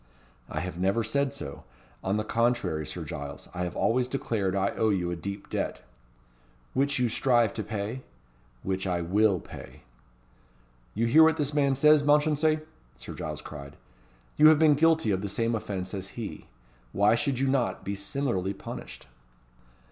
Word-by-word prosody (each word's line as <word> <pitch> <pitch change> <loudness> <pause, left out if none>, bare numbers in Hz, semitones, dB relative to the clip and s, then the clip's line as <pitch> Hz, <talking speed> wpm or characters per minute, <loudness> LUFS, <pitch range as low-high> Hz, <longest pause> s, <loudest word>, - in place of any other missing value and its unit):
"I - - -3
have 90 -1 -5
never 95 +5 +1
said 140 +3 0
so. 75 - -8 0.4
On 95 +2 0
the 105 - -1
contrary, 115 - 0
Sir - - -5
Giles, 70 0 -7
I 90 +1 -2
have 90 - -5
always 125 +2 +1
declared 110 -7 -1
I 100 0 +1
owe 110 - +1
you 90 -4 0
a - - -2
deep 100 +4 -6
debt." - - -3 0.9
"Which 140 +2 +1
you 125 -1 +2
strive 120 -2 +2
to - - -3
pay?" 110 +4 -4 0.6
"Which 95 0 -2
I 90 -2 0
will 100 +2 +2
pay." - - -11 1.1
"You 115 +3 +1
hear 140 +8 +6
what 160 0 +6
this 145 -1 -1
man 140 -2 +2
says, 150 +2 +6
Mounchensey?" 150 +1 +3 0.4
Sir - - -8
Giles 75 -1 -6
cried. 70 -2 -9 0.6
"You 155 - +8
have 155 -1 +7
been 155 -1 +5
guilty 160 -5 +3
of 95 -1 0
the 100 - -3
same 115 +4 0
offence 95 -4 -4
as 95 +2 -6
he. 115 -3 -6 0.5
Why 100 +2 +4
should 135 +2 0
you 135 +2 +1
not 130 -2 0
be 100 - -2
similarly 100 -2 -2
punished?" - - -9
110 Hz, 170 wpm, -28 LUFS, 95-140 Hz, 1.1 s, You